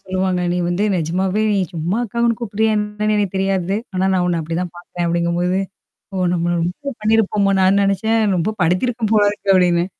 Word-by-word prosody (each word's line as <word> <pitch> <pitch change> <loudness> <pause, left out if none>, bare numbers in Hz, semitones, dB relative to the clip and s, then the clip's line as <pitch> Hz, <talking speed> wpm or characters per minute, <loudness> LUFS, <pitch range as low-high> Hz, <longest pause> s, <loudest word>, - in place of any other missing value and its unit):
சொல்லுவாங்க. 185 -1 -1
நீ 180 - -1
வந்து 175 +4 0
நிஜமாவே 185 +5 0
நீ 205 - +1 0.2
சும்மா 170 +4 -2
அக்கான்னு 235 +1 0
கூப்புட்றியா 220 -1 0
என்னன்னு 210 0 -1
எனக்கு 200 -2 -1
தெரியாது. 190 0 0 0.2
ஆனா 185 +1 0
நான் 185 -1 +1
உன்ன 175 -1 0
அப்பிடிதான் 165 +2 -3
பாத்தேன் 175 0 -5
அப்பிடிங்கம்போது. 170 +2 0 0.6
ஓ! 190 - -3 0.2
நம்மள 175 0 0
ரொம்ப 180 +12 -4
பண்ணியிருப்போமோ! 215 -2 +2
நான் 195 +2 +4
நினச்சேன். 210 +3 +1 0.2
ரொம்ப 195 +6 -1
படுத்திருக்கேன் 215 +6 0
போல 210 -1 +5
இருக்கு 200 -1 -1
அப்பிடின்னு. 175 -2 +3
190 Hz, 170 wpm, -19 LUFS, 175-210 Hz, 0.6 s, போல